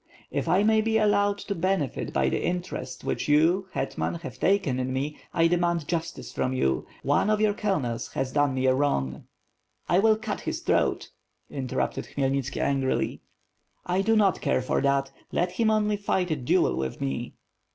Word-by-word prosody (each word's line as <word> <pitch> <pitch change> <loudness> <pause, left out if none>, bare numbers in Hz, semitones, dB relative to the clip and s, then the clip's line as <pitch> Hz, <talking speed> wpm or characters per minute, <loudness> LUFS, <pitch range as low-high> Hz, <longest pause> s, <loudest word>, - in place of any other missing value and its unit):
"If - - -2
I 190 +3 +4
may 220 0 +4
be 220 0 +1
allowed 205 -1 +3
to 200 - -2
benefit 185 - -1
by 65 -1 +1
the - - 0
interest 180 0 -4
which - - -2
you, 165 +6 +3
hetman, - - -2
have - - -8
taken 180 -9 +2
in 130 0 -2
me, 140 +3 -3
I 165 - +2
demand 170 -2 +1
justice 170 -1 -3
from 130 - -1
you. 65 - 0 0.2
One - - +2
of 215 0 +2
your 215 -1 +3
colonels 170 - -2
has 130 -1 -2
done 145 -2 +2
me 130 0 0
a 130 - +5
wrong 70 - -1 0.3
..." - - -46
"I 175 - +3
will 215 +1 +4
cut 220 - -4
his - - -3
throat!" - - 0 0.4
interrupted 130 -3 -2
Khmyelnitski, 135 -1 -1
angrily. 135 -2 0 0.6
"I 180 +2 +1
do 225 +3 +2
not 200 -4 +3
care 130 - +1
for - - 0
that; 140 -1 +1 0.2
let 175 +1 0
him 220 +4 +1
only 210 -1 +2
fight 190 -3 0
a - - +2
duel 125 -4 +2
with 65 -1 -3
me." 70 0 -3
165 Hz, 185 wpm, -26 LUFS, 135-200 Hz, 0.6 s, a